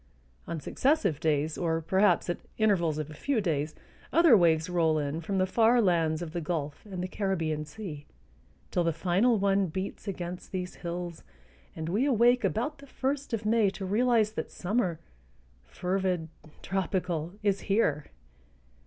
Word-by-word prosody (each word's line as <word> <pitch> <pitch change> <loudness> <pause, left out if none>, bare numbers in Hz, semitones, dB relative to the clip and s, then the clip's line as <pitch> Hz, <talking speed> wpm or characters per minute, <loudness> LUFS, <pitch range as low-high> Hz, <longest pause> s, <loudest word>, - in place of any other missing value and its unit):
On 165 - -3
successive 200 - +1
days 155 0 0
or, 165 -2 +1
perhaps, 190 +2 +2
at 175 - -2 0.2
intervals 180 -8 +2
of 155 0 -4
a - - -8
few 265 - 0
days 155 -6 -1 0.4
other 335 -7 +7
waves 165 -4 +4
roll 165 -3 +2
in 150 +2 -2
from 195 +4 -2
the 185 - +3
far 230 +5 +4
lands 170 -5 +2
of 160 -2 -7
the 175 - -2
Gulf 150 -3 -3
and 185 -3 -5
the - - -2
Caribbean 165 -6 -1
Sea, 150 -4 -8 0.6
till 175 - +1
the 165 -1 +1
final 190 +8 +2
one 195 -1 +2
beats 190 +5 -5
against 180 -2 -5
these 180 -1 -4
hills 175 -1 -5 0.5
and 160 0 -4
we 210 +11 +1
awake 245 -1 +4
about 275 +7 -1
the 280 - -13
first 275 +1 -2
of 225 -2 -2
May 215 -2 +3
to 195 0 -6
realize 220 +1 +2
that - - -4
summer, 185 -4 -1 0.7
fervid, 180 - -1 0.3
tropical, 180 -3 -2
is 200 -2 +2
here. 195 -8 +1
180 Hz, 160 wpm, -29 LUFS, 160-210 Hz, 0.7 s, other